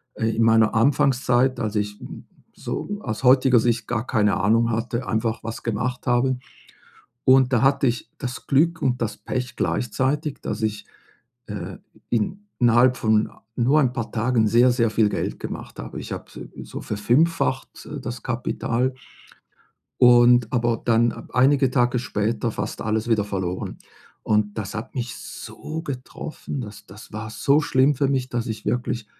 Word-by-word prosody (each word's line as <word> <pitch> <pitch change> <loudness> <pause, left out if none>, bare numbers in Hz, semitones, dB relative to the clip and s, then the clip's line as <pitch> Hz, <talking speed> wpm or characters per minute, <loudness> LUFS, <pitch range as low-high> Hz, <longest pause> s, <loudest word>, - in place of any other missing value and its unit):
äh, 110 0 0
in 115 - +2
meiner 110 -1 +4
Anfangszeit, 130 0 +2
als 110 -2 -2
ich, 105 0 -2
hm, - - -10 0.3
so 205 0 -4
aus 110 +1 -4
heutiger 130 -1 +6
Sicht 115 -1 0
gar 120 0 -2
keine 105 -3 +2
Ahnung 115 +4 +3
hatte, 115 +2 -2
einfach 110 0 -1
was 115 0 -6
gemacht 120 +3 -2
habe. 125 +1 +2 0.9
Und 130 -1 +5
da 120 - +3
hatte 135 0 +3
ich 120 0 -2
das 125 -1 -6
Glück 165 +4 +2
und 125 -1 0
das 105 -2 -2
Pech 125 0 -4
gleichzeitig, 135 +6 -1
dass - - -4
ich, 105 -1 -2 0.6
äh, 95 -3 -6 0.3
in 120 - -1 0.2
innerhalb 125 +1 +4
von 110 -1 +2 0.3
nur 130 +5 +3
'n 125 -2 +1
paar 120 -3 -4
Tagen 115 -1 +1
sehr, 120 +4 +5
sehr 115 -2 +2
viel 110 -1 +3
Geld - - -3
gemacht - - -7
habe. - - -6
Ich - - -8
habe, - - -6 0.3
äh, - - -6
so - - -8
verfünffacht, 130 +6 0
äh, - - -6
das 120 -1 -6
Kapital 120 +1 -1 1.0
und 120 -1 +6
aber 120 -2 +1
dann 115 0 +1
einige 135 +1 +4
Tage 125 -1 +2
später 115 -1 -1
fast 100 +1 -5
alles 110 +1 -1
wieder 110 -2 +3
verloren. 95 -3 -4 0.5
Und 105 0 +1
das 105 -2 -4
hat 110 +4 -6
mich 120 -3 -3
so 160 +1 -7
getroffen, 140 +1 -6
das 105 -3 -9
das 105 +4 -13
war 110 0 -5
so 140 +7 +3
schlimm 145 0 +3
für 140 +1 +1
mich, 130 -2 -1
dass 120 -1 -2
ich 110 -2 -5
wirklich 120 -2 -1
120 Hz, 160 wpm, -23 LUFS, 110-130 Hz, 1.0 s, heutiger